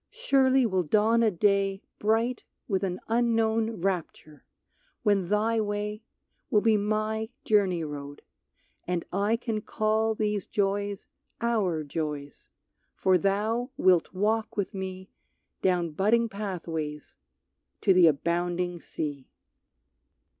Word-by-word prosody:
Surely 270 Hz, -, +3 dB
will 190 Hz, -4 st, +1 dB
dawn 215 Hz, +7 st, +3 dB
a 225 Hz, -, +4 dB
day 195 Hz, +1 st, +1 dB, 0.2 s
Bright 225 Hz, +3 st, +1 dB, 0.3 s
with 190 Hz, -2 st, 0 dB
an 185 Hz, -1 st, -2 dB
unknown 225 Hz, -2 st, +1 dB
rapture, 170 Hz, -5 st, -3 dB, 0.6 s
when 200 Hz, -5 st, +2 dB
thy 220 Hz, +3 st, +1 dB
way 210 Hz, +1 st, -3 dB, 0.5 s
Will 210 Hz, -5 st, +3 dB
be 225 Hz, -1 st, +4 dB
my 215 Hz, +1 st, -1 dB, 0.2 s
journey 190 Hz, -6 st, +2 dB
road, 145 Hz, -1 st, -7 dB, 0.6 s
and 180 Hz, -1 st, -1 dB
I 200 Hz, +4 st, +2 dB
can 230 Hz, -2 st, -3 dB
call 220 Hz, +1 st, 0 dB
These 210 Hz, -2 st, -1 dB
joys 200 Hz, 0 st, -1 dB, 0.3 s
our 210 Hz, -9 st, 0 dB
joys, 145 Hz, -1 st, -5 dB, 0.5 s
for 185 Hz, -1 st, +3 dB
thou 215 Hz, +6 st, 0 dB
wilt 180 Hz, -3 st, +3 dB
walk 215 Hz, +4 st, -1 dB
with 200 Hz, -3 st, -1 dB
me 190 Hz, -1 st, -6 dB, 0.5 s
Down 175 Hz, -3 st, +1 dB
budding 220 Hz, +8 st, +2 dB
pathways 165 Hz, -7 st, -5 dB, 0.7 s
to 190 Hz, -, +5 dB
the 180 Hz, -2 st, +7 dB
abounding 175 Hz, +3 st, 0 dB
sea. 145 Hz, -5 st, -5 dB
200 Hz, 115 wpm, -27 LUFS, 180-220 Hz, 0.7 s, the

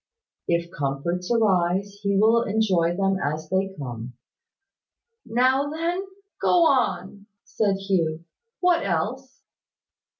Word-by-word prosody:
If 170 Hz, 0 st, 0 dB
comforts 145 Hz, +6 st, -3 dB
arise, 200 Hz, -3 st, +1 dB
he 200 Hz, -1 st, +1 dB
will 225 Hz, +3 st, +4 dB
enjoy 195 Hz, -6 st, +1 dB
them 195 Hz, -1 st, +1 dB
as 155 Hz, +2 st, -3 dB
they 190 Hz, +1 st, 0 dB
come." 120 Hz, -3 st, -6 dB, 1.1 s
"Now 260 Hz, +5 st, +2 dB
then, 340 Hz, +5 st, -2 dB, 0.3 s
go 350 Hz, -2 st, +4 dB
on," 205 Hz, -, 0 dB, 0.2 s
said 205 Hz, -3 st, 0 dB
Hugh. 170 Hz, -5 st, -1 dB, 0.4 s
"What 360 Hz, -2 st, +3 dB
else?" 240 Hz, +10 st, -3 dB
195 Hz, 105 wpm, -24 LUFS, 170-235 Hz, 1.1 s, will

